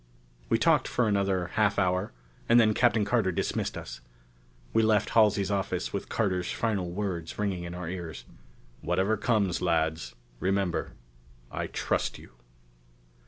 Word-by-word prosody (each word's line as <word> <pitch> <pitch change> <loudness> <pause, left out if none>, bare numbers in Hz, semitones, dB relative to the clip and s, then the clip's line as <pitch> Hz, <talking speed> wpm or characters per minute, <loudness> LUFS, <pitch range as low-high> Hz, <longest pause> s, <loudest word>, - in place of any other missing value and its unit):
We - - +4
talked - - +3
for 125 - +1
another 95 -3 +1
half 105 -2 +2
hour, 90 0 +1 0.4
and 120 +1 +7
then 110 -2 +4
Captain 110 -3 +3
Carter 105 -3 +2
dismissed 85 - -2
us. - - -8 0.7
We 115 - +4
left 110 -1 +2
Halsey's 105 -3 +3
office 100 -1 -2
with - - -4
Carter's 90 -5 0
final 100 -6 -1
words 90 -3 -4
ringing 95 -4 -2
in 85 0 -6
our 90 -1 -5
ears. 85 -8 -6 0.6
"Whatever 95 +5 +1
comes, 100 -5 +1
lads, 80 -2 0 0.2
remember 95 0 -1 0.6
I - - -3
trust - - -1
you...." - - -14
95 Hz, 140 wpm, -28 LUFS, 90-105 Hz, 0.7 s, and